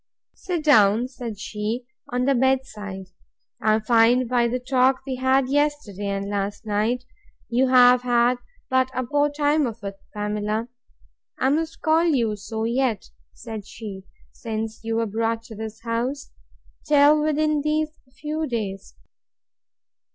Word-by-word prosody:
Sit 350 -4 -4
down, 225 -5 +5
said 240 -5 -7
she, 215 +4 -4 0.2
on 250 0 0
the 275 - +3
bed 265 +1 +2
side.—I 205 0 -4
find, 235 +2 +4
by 240 -1 +2
the 245 +2 -1
talk 255 +1 +2
we 265 -2 -3
had 260 +1 +2
yesterday 285 -8 -1
and 200 0 -2
last 205 +1 -3
night, 220 +4 0 0.5
you 250 +2 +2
have 250 -1 +6
had 245 0 +2 0.3
but 260 0 +2
a 255 - 0
poor 290 +4 +1
time 295 0 +1
of 225 -2 -8
it, 200 0 -6
Pamela, 210 +2 -2 0.7
(I 265 - +2
must 320 +3 -1
call 320 +2 +3
you 240 -10 +1
so 220 +2 -5
yet, 235 -2 -1 0.2
said 220 -3 -8
she,) 200 -4 -8 0.3
since 220 0 -5
you 225 0 -2
were 230 0 +1
brought 225 +2 -1
to 225 -1 -11
this 220 +1 -7
house, 240 +5 -3 0.6
till 295 +1 +5
within 305 0 +1
these 310 +1 -1 0.2
few 310 +1 -2
days. 200 - -4
240 Hz, 145 wpm, -23 LUFS, 215-270 Hz, 0.7 s, have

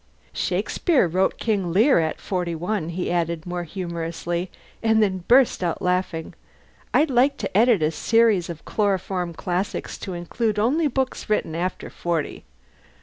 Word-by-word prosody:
"Shakespeare 210 - +1
wrote 185 +3 +1
'King 200 -6 -1
Lear' 220 - +5
at 160 -1 -1
forty 180 -3 -2
one," 175 0 -2
he 175 +1 -3
added, 170 -1 -1
more 175 -1 -4
humorously; 170 0 -4 0.3
and 220 -1 +3
then 185 -3 -1
burst 250 -5 +4
out 170 -2 -1
laughing. 180 -3 -1 0.6
"I'd 300 -1 +3
like 265 +3 +3
to - - -5
edit 220 -5 +4
a 155 - +2
series 220 -1 +2
of 165 -2 -8
'Chloroform 190 -4 -1
Classics,' 180 +4 -3
to 185 - -5
include 210 +5 -2
only 280 +10 +2
books 265 -3 -2
written 210 -6 0
after 180 +3 -3
forty. 170 - -3
185 Hz, 145 wpm, -23 LUFS, 170-220 Hz, 0.6 s, Lear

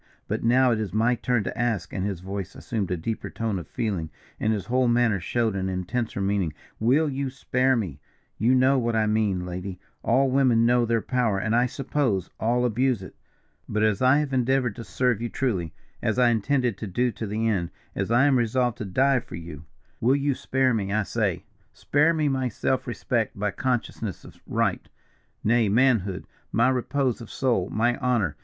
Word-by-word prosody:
But - - -2
now 125 +2 +4
it 115 - +1
is 105 -3 -4
my 115 +3 +3
turn 120 -2 0
to - - -4
ask," 115 -8 -1
and 95 - -2
his 95 -4 -3
voice 95 0 -5
assumed 105 -6 -3
a 90 - -1
deeper 110 +7 -4
tone 110 -4 -2
of 85 - -9
feeling, 95 -9 -2 0.3
and 110 - +1
his 105 -3 -2
whole 125 +1 +2
manner 120 -4 +3
showed 110 +3 0
an 95 0 -1
intenser 95 +5 -2
meaning, 95 -5 0 0.3
"will 135 +8 +3
you 135 -1 -2
spare 130 0 +1
me? 90 - -3 0.4
You 120 +4 +4
know 130 +1 +4
what 115 -1 0
I 110 -1 +2
mean, 105 -4 +1
lady 90 +1 -6 0.2
all 135 0 +2
women 125 -4 +4
know 120 0 +4
their 115 -1 +1
power, 120 -6 +1
and, 110 +4 0
I 120 +1 +3
suppose, 125 - -1
all 120 +2 +1
abuse 125 -2 +1
it. - - -11 0.5
But 105 0 0
as 110 -1 +2
I 130 +2 +5
have 150 -2 -1
endeavoured 125 -3 +1
to 115 - -6
serve 115 +4 0
you 120 - -2
truly, 95 - -1 0.3
as 110 0 0
I 125 -1 +5
intend 120 +4 +1
to 110 -3 -2
do 120 +6 0
to 110 - -5
the 110 +3 -1
end 90 -6 0 0.2
as - - -2
I 120 +4 +4
am 135 -3 +4
resolved 120 +1 0
to 110 - -3
die 130 +8 +2
for - - -10
you 80 -3 -9 0.3
will 125 +4 +3
you 140 0 +1
spare 130 0 +1
me, 100 -3 -1
I 105 +1 +1
say? - - -1 0.3
Spare 150 +3 +2
me 155 -2 +1
my 130 -2 0
self 130 +4 -1
respect, 120 -2 -1
my 105 +1 -1
consciousness 115 -2 -3
of - - -14
right, - - -1 0.5
nay 115 -1 +3
manhood, 110 -5 +2 0.3
my 120 +3 +3
repose 130 -1 0
of 115 - -9
soul, 115 -8 0
my 120 +3 +1
honour. 120 -10 +1
115 Hz, 200 wpm, -25 LUFS, 100-125 Hz, 0.5 s, I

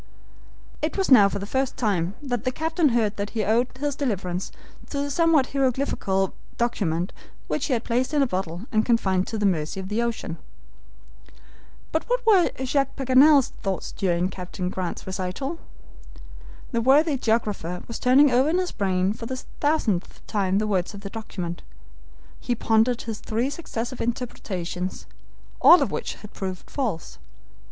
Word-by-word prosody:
It 310 +5 -2
was 385 -6 0
now 205 -6 +8
for 200 - -3
the 200 - -4
first 265 +4 -1
time 195 -5 0
that 245 -5 -2
the 255 - 0
captain 320 +2 +1
heard 225 -4 +1
that 200 0 -2
he 215 - +1
owed 230 +4 +2
his 290 0 -2
deliverance 190 -9 -2 0.4
to 285 - -4
the 285 0 -2
somewhat 325 -3 +3
hieroglyphical 255 -8 0 0.2
document 185 -7 -1 0.3
which - - -2
he 275 - +1
had 235 -1 0
placed 250 +4 0
in 295 -2 +3
a - - +3
bottle 185 -3 -3
and 215 -2 +3
confined 190 -6 +2
to 225 - -3
the 210 - 0
mercy 170 -1 0
of 190 0 -6
the 215 +3 0
ocean. 235 -8 -3 1.5
But 320 +8 -1
what - - 0
were 395 -6 +5 0.2
Jacques 275 +1 0
Paganel's 270 +1 +5
thoughts 195 -3 -3
during 180 -1 0
Captain 180 0 -5
Grant's 185 -2 -4
recital? 190 - -4 1.1
The 235 -3 0
worthy 285 +5 +4
geographer 215 -8 -1
was 230 - -5
turning 265 +3 +5
over 255 +4 +4
in 340 - +2
his 365 -1 -1
brain 190 -1 0
for 230 +1 -7
the 260 - -4 0.2
thousandth 250 - 0
time 195 -3 0
the 215 - +1
words 195 -1 -1
of 200 - -9
the 200 -1 -7
document. 180 -6 -5 0.8
He 245 - -1
pondered 225 +2 +2
his 225 -2 -5
three 235 +5 -1
successive 255 -5 -5
interpretations, 185 -7 -4 0.6
all 350 - +8
of - - -3
which - - -3
had 210 - -13
proved 185 -2 -6
false. 220 - -3
225 Hz, 165 wpm, -25 LUFS, 190-270 Hz, 1.5 s, now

